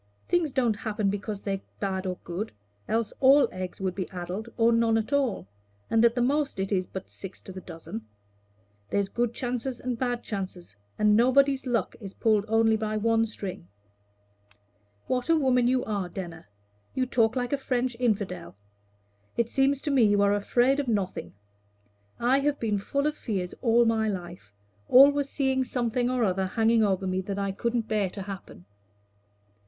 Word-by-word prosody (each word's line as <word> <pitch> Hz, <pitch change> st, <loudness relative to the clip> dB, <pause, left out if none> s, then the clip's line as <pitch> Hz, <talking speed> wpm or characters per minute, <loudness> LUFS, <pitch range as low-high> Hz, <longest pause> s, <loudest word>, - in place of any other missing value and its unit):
Things 345 Hz, -4 st, +1 dB
don't 245 Hz, -5 st, +1 dB
happen 210 Hz, -2 st, -1 dB
because 205 Hz, 0 st, -5 dB
they're 195 Hz, -1 st, -2 dB, 0.2 s
bad 190 Hz, -1 st, -2 dB
or 180 Hz, -1 st, -3 dB
good, 180 Hz, +6 st, -4 dB, 0.4 s
else 225 Hz, -1 st, 0 dB
all 275 Hz, +2 st, +6 dB
eggs 185 Hz, -1 st, -6 dB
would 190 Hz, -2 st, -1 dB
be 185 Hz, 0 st, -4 dB
addled 185 Hz, +5 st, -5 dB
or 230 Hz, 0 st, +4 dB
none 230 Hz, -1 st, +3 dB
at 225 Hz, +5 st, -2 dB
all, 265 Hz, -, 0 dB, 0.4 s
and 225 Hz, 0 st, +4 dB
at 235 Hz, 0 st, +4 dB
the 245 Hz, -, +2 dB
most 280 Hz, -3 st, 0 dB
it 195 Hz, +1 st, -2 dB
is 185 Hz, -2 st, +1 dB
but 190 Hz, -, -8 dB
six 195 Hz, -1 st, -8 dB
to -, -, -9 dB
the 185 Hz, 0 st, -8 dB
dozen. 115 Hz, -11 st, -8 dB, 0.8 s
There's 200 Hz, -1 st, 0 dB
good 235 Hz, +2 st, 0 dB
chances 245 Hz, +1 st, -3 dB
and 250 Hz, -2 st, -3 dB
bad 245 Hz, -2 st, -1 dB
chances, 185 Hz, -, -6 dB, 0.2 s
and 210 Hz, 0 st, +4 dB
nobody's 265 Hz, +3 st, +3 dB
luck 230 Hz, -6 st, 0 dB
is 195 Hz, -2 st, -9 dB
pulled 215 Hz, -2 st, +2 dB
only 225 Hz, 0 st, +3 dB
by 215 Hz, 0 st, -2 dB
one 225 Hz, +1 st, +2 dB
string." 195 Hz, -, -6 dB, 1.4 s
"What 250 Hz, +3 st, -1 dB
a 330 Hz, -, +6 dB
woman 255 Hz, -5 st, +3 dB
you 255 Hz, 0 st, +1 dB
are, 200 Hz, -4 st, -2 dB
Denner! 170 Hz, -, -7 dB, 0.5 s
You 260 Hz, -, +1 dB
talk 230 Hz, -2 st, +2 dB
like 245 Hz, +1 st, -1 dB
a -, -, +2 dB
French 250 Hz, -2 st, -1 dB
infidel. 200 Hz, -, -1 dB, 0.8 s
It 235 Hz, -1 st, +1 dB
seems 270 Hz, +1 st, +2 dB
to 295 Hz, -, -2 dB
me 270 Hz, -3 st, +4 dB
you 205 Hz, -2 st, +4 dB
are 200 Hz, 0 st, +4 dB
afraid 245 Hz, +6 st, +2 dB
of 280 Hz, -, -2 dB
nothing. 200 Hz, -, -2 dB, 0.8 s
I 255 Hz, +3 st, +3 dB
have 290 Hz, +1 st, 0 dB
been 210 Hz, -3 st, 0 dB
full 280 Hz, +8 st, -1 dB
of 300 Hz, 0 st, 0 dB
fears 190 Hz, -9 st, -3 dB
all 235 Hz, -1 st, +4 dB
my 225 Hz, -1 st, +2 dB
life 175 Hz, -, -6 dB, 0.4 s
always 280 Hz, +2 st, +6 dB
seeing 265 Hz, -2 st, +1 dB
something 245 Hz, -1 st, -1 dB
or 250 Hz, -1 st, +1 dB
other 190 Hz, -2 st, +1 dB
hanging 225 Hz, +3 st, +3 dB
over 195 Hz, -2 st, +1 dB
me 185 Hz, 0 st, 0 dB
that 195 Hz, +1 st, -5 dB
I 200 Hz, -1 st, -1 dB
couldn't 235 Hz, +3 st, -1 dB
bear 210 Hz, -3 st, +1 dB
to 195 Hz, +1 st, -6 dB
happen." 190 Hz, -, -9 dB
225 Hz, 180 wpm, -27 LUFS, 195-250 Hz, 1.4 s, all